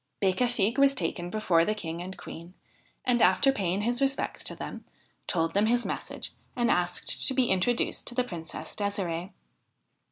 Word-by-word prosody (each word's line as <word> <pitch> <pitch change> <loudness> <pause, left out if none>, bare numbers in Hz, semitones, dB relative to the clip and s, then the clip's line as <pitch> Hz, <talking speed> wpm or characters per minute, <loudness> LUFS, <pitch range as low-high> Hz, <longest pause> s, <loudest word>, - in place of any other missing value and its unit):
Becafigue 225 +4 +1
was 275 0 +5
taken 175 0 -2
before 180 -5 +2
the 215 +4 0
King 170 -4 -5
and 185 +2 -7
Queen, 170 +3 -10 0.5
and, 240 -2 +3
after 190 +9 +5
paying 195 -5 -1
his 240 +4 0
respects 275 0 -1
to - - -2
them, - - -7 0.4
told 165 -2 +1
them 205 +2 +3
his 240 +1 +2
message - - -4 0.2
and 240 -1 +2
asked 175 0 +2
to 265 - +2
be 250 -4 +2
introduced 190 +6 +1
to 240 - -4
the 250 - +2
Princess 170 -9 -7
De"sire"e. 190 -4 -2
200 Hz, 165 wpm, -28 LUFS, 175-240 Hz, 0.5 s, was